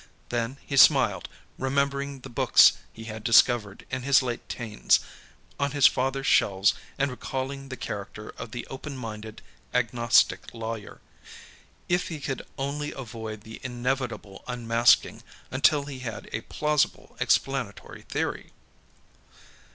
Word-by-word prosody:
Then 120 +2 -2
he 140 - -3
smiled, 125 - +5 0.3
remembering 140 +1 -1
the 135 - -9
books 120 - +6 0.2
he 115 - -11
had 110 -1 -7
discovered, 115 -3 +4
in 130 0 -2
his 135 +1 +4
late 120 -2 -4
'teens, 110 -4 +1 0.6
on 140 0 0
his 145 -2 +4
father's 135 +1 +2
shelves 95 -4 +4 0.2
and 140 0 +1
recalling 135 +2 -5
the 130 - -6
character 105 -1 -6
of - - -8
the 120 +2 -6
openminded 115 -6 -7 0.3
agnostic 120 -1 +3
lawyer. 115 -2 -6 0.9
If 175 +1 +1
he 160 -3 -5
could 140 -2 -3 0.2
only 145 +2 -3
avoid 110 -4 -7
the 110 +1 -11
inevitable 125 -4 -3
unmasking 120 -1 +3 0.3
until 140 +2 +3
he 140 -2 -7
had 120 -4 -6
a 110 - -2
plausible 150 +3 -1
explanatory 135 -7 -1
theory. - - -4
125 Hz, 125 wpm, -27 LUFS, 115-135 Hz, 0.9 s, books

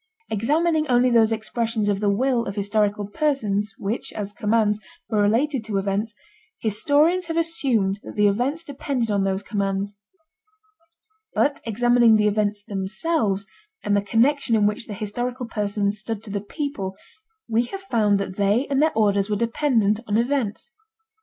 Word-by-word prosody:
Examining 305 +8 +1
only 250 0 +3
those 225 -1 +4
expressions 225 0 -1
of 200 -1 +1
the 205 -1 +1
will 240 +3 +1
of 200 - -4
historical 205 0 0
persons 210 -6 -1
which, 205 +4 -3
as 205 -1 -5
commands, 210 -1 +1 0.3
were 210 -2 +2
related 240 +5 +1
to 215 -2 -2
events, 200 +2 -1 0.4
historians 300 - +2
have 330 0 -2
assumed 250 -12 +1
that - - -10
the 210 - +3
events 255 +11 0
depended 265 -6 -2
on 200 -1 +1
those 195 +1 -1
commands. 200 0 -2 1.4
But 285 0 +1
examining 240 0 +4
the 210 -1 +3
events 205 0 0
themselves 200 - -1 0.4
and 205 -1 +1
the 200 - +3
connection 235 +4 +2
in 210 -2 +3
which 210 +2 -1
the 210 - -6
historical 245 +5 -3
persons 205 -2 -1
stood 215 0 -4
to 215 - -8
the 200 0 -2
people, 205 -5 -4 0.5
we 230 +1 +1
have 390 +10 -7
found 215 - +2
that 195 -1 -5
they 205 +6 +2
and 275 0 +2
their 315 0 +3
orders 200 -2 +2
were 210 - +1
dependent 230 -2 +1
on 210 0 +1
events. 240 -2 -1
220 Hz, 160 wpm, -23 LUFS, 205-250 Hz, 1.4 s, those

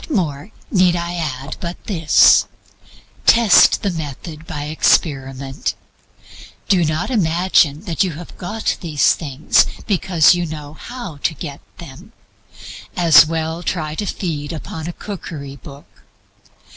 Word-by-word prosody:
What - - -13
more 155 +1 -3 0.2
need 185 -3 +3
I 170 0 -3
add 145 -5 -4
but 175 0 -6
this 165 -7 +4 0.8
test 230 -4 +6
the 200 - 0
method 155 0 -7
by 145 - -5
experiment. 135 -3 0 0.9
Do 185 -4 +3
not 155 +8 -1
imagine 170 - +2
that 180 -1 -1
you 185 -3 -2
have 170 +3 -10
got 215 +5 -2
these 155 -6 +2
things 145 -2 +1 0.2
because 180 -5 +3
you 175 -1 -2
know 150 -2 -8
how 235 - -8
to 160 +3 -2
get 140 +1 -8 0.2
them. 170 - -12 0.8
As 165 -4 +7
well 160 +1 -3
try 155 -3 -3
to 205 +6 -4
feed 155 -7 -4
upon 160 0 -7
a 175 - -5
cookery 155 -10 -8
book. 140 +2 -13
160 Hz, 130 wpm, -19 LUFS, 150-180 Hz, 0.9 s, As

